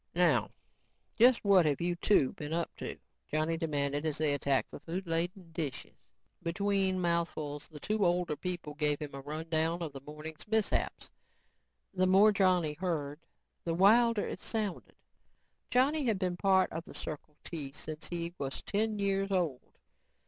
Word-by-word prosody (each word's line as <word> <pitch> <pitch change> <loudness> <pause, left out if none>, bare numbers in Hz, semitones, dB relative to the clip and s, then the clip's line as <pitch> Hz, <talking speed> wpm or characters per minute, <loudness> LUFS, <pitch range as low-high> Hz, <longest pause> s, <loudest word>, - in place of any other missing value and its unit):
"Now - - +3 0.7
just 240 -1 +5
what 190 -5 +6
have 145 -2 +1
you 175 +1 0
two 170 -6 +3
been 150 +1 -5
up 170 0 -2
to," - - -5 0.3
Johnny 155 +2 +1
demanded 145 -3 -1
as 155 -2 -1
they 150 -2 +2
attacked 140 -1 +1
the - - -8
food 180 +4 -5
laden 170 +1 -2
dishes. 155 -5 -6 0.3
Between 190 +2 +1
mouthfuls, 165 -4 -1
the 150 - -11
two 215 +6 0
older 175 -3 +2
people 175 -2 -4
gave 150 -1 +1
him 150 -2 -6
a 135 - -6
rundown 160 +3 -1
on 155 - -4
the 135 -1 -9
morning's 150 +4 -9
mishaps. 220 -1 0 0.8
The 185 -1 +2
more 195 +3 +7
Johnny 185 -6 +3
heard, 150 -4 -3 0.4
the 165 -1 -1
wilder 225 +4 +5
it - - -5
sounded. 215 -5 -4 0.7
Johnny 275 +4 +3
had 225 -4 +2
been 185 -2 -1
a - - -8
part 190 0 +3
of 165 +1 -4
the - - -11
Circle 150 0 -6
T 150 -5 -5
since 155 +2 -7
he 170 0 -3
was 135 -1 -4
ten 215 +1 0
years 195 -1 +1
old. 170 -9 0
170 Hz, 165 wpm, -32 LUFS, 150-195 Hz, 0.8 s, more